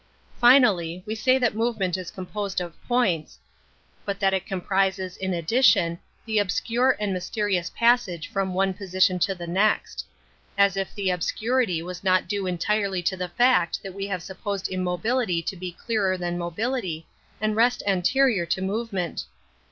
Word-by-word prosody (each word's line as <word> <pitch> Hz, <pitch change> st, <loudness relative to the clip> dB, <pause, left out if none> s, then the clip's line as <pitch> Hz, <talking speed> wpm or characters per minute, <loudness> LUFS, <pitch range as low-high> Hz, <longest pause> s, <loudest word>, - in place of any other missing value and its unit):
Finally, 200 Hz, -9 st, +4 dB
we 215 Hz, -, -3 dB
say 255 Hz, +4 st, +3 dB
that 245 Hz, -3 st, +1 dB
movement 215 Hz, -5 st, 0 dB
is 185 Hz, -2 st, -5 dB
composed 195 Hz, +1 st, -4 dB
of 175 Hz, -2 st, -5 dB
points, 200 Hz, -11 st, 0 dB, 0.7 s
but 200 Hz, -1 st, -4 dB
that 195 Hz, -2 st, +2 dB
Metaphysics 190 Hz, 0 st, -1 dB
51 -, -, -19 dB
it -, -, -16 dB, 0.2 s
comprises, 190 Hz, -1 st, 0 dB
in 190 Hz, -1 st, -2 dB
addition, 170 Hz, -2 st, +3 dB, 0.3 s
the 220 Hz, -2 st, +1 dB
obscure 230 Hz, +6 st, +1 dB
and 205 Hz, -2 st, -1 dB
mysterious 185 Hz, -1 st, -1 dB
passage 230 Hz, -9 st, +1 dB
from 190 Hz, -2 st, -2 dB
one 190 Hz, 0 st, +1 dB
position 185 Hz, -1 st, +1 dB
to 195 Hz, +2 st, +1 dB
the 175 Hz, -1 st, -7 dB
next. 195 Hz, +5 st, 0 dB, 0.5 s
As 200 Hz, -1 st, +4 dB
if 195 Hz, -1 st, -3 dB
the 195 Hz, -2 st, 0 dB
obscurity 200 Hz, +1 st, 0 dB
was 180 Hz, +1 st, -7 dB
not 185 Hz, -1 st, +2 dB
due 200 Hz, -2 st, -2 dB
entirely 190 Hz, +1 st, 0 dB
to 190 Hz, -, 0 dB
the 180 Hz, -1 st, -4 dB
fact 240 Hz, -5 st, +2 dB
that 195 Hz, -2 st, -7 dB
we 195 Hz, +1 st, -4 dB
have 185 Hz, -4 st, -3 dB
supposed 195 Hz, +1 st, -4 dB
immobility 185 Hz, +2 st, 0 dB
to 190 Hz, -, -3 dB
be 180 Hz, 0 st, -6 dB
clearer 195 Hz, 0 st, -1 dB
than 175 Hz, -1 st, -3 dB
mobility 175 Hz, -1 st, -3 dB, 0.3 s
and 215 Hz, +1 st, 0 dB
rest 240 Hz, +2 st, +2 dB
anterior 200 Hz, +1 st, +2 dB
to 170 Hz, -, 0 dB
movement! 195 Hz, -3 st, -3 dB
195 Hz, 165 wpm, -25 LUFS, 180-215 Hz, 0.7 s, Finally